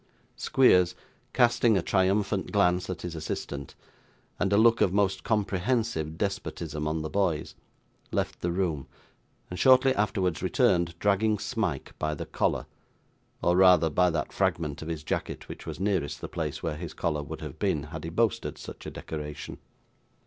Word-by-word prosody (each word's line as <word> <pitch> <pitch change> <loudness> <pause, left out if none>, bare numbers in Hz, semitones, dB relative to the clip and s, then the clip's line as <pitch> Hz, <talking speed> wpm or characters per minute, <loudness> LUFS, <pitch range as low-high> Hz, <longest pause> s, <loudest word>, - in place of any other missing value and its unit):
Squeers, 90 -9 +4 0.4
casting 120 -3 +4
a 90 - 0
triumphant 95 +1 +1
glance 90 -3 +2
at 90 - -5
his 90 -1 -4
assistant 70 -3 -5 0.6
and 95 - +1
a 100 - +4
look 115 +1 +5
of 90 - +4
most 95 -1 +1
comprehensive 105 -5 0
despotism 85 -6 -3
on 80 0 -1
the - - -2
boys, 90 -6 0 0.6
left - - -2
the 85 - 0
room, 85 -6 -1 0.6
and 90 - -5
shortly 130 +2 +6
afterwards 95 -5 0
returned, 85 -1 +2
dragging 105 +3 +2
Smike 100 - -3
by 75 0 -1
the - - -5
collar - - 0 0.8
or 90 - +3
rather 90 -4 +6
by 90 +4 +3
that 80 -3 -2
fragment 75 -2 -1
of 80 - -6
his 80 -2 -4
jacket - - -3
which - - -9
was - - -5
nearest 95 -6 -1
the - - -5
place - - -4
where 75 -2 -2
his 80 -1 -7
collar 75 -4 -1
would 80 +2 -7
have 75 -3 -8
been, 75 - 0
had 75 +1 -7
he 80 - -4
boasted 110 +6 0
such - - -9
a - - -3
decoration. 75 -2 -7
90 Hz, 165 wpm, -28 LUFS, 80-100 Hz, 0.8 s, shortly